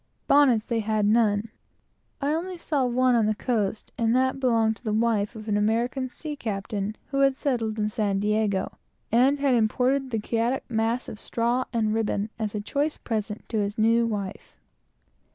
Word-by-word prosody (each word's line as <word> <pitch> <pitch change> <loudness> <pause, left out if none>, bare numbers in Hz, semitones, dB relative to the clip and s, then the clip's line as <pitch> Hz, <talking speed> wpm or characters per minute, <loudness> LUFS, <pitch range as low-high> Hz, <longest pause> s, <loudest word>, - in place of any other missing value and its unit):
Bonnets 260 -6 +4
they 230 -1 -1
had 215 -1 0
none. 215 0 +2 0.7
I 285 +1 0
only 355 +3 -3
saw 295 -5 0
one 255 +1 +3
on 225 -3 +3
the 215 - +1
coast, 215 -3 -2
and 230 0 +2
that 260 +1 +1
belonged 225 -4 +2
to - - -25
the 220 - -2
wife 220 0 +1
of 220 0 -9
an 205 -1 +1
American 235 +5 0
sea 300 +3 -6
captain 205 -3 -3 0.2
who 275 - 0
had 275 -1 +4
settled 230 -6 -1
in 210 -1 0
San 205 -2 0
Diego, 210 -1 0 0.3
and 255 +5 +4
had 280 -2 +2
imported 250 +4 +1
the 230 - -1
chaotic 230 +4 -1
mass 230 +2 -1
of 210 - -8
straw 240 +2 0
and 220 -3 0
ribbon, 215 -1 -1
as 215 -1 -3
a 210 - -2
choice 290 +8 -1
present 215 -2 -4
to 220 - 0
his 205 +1 -2
new 230 +1 +3
wife. 200 -4 -5
225 Hz, 180 wpm, -26 LUFS, 215-255 Hz, 0.7 s, Bonnets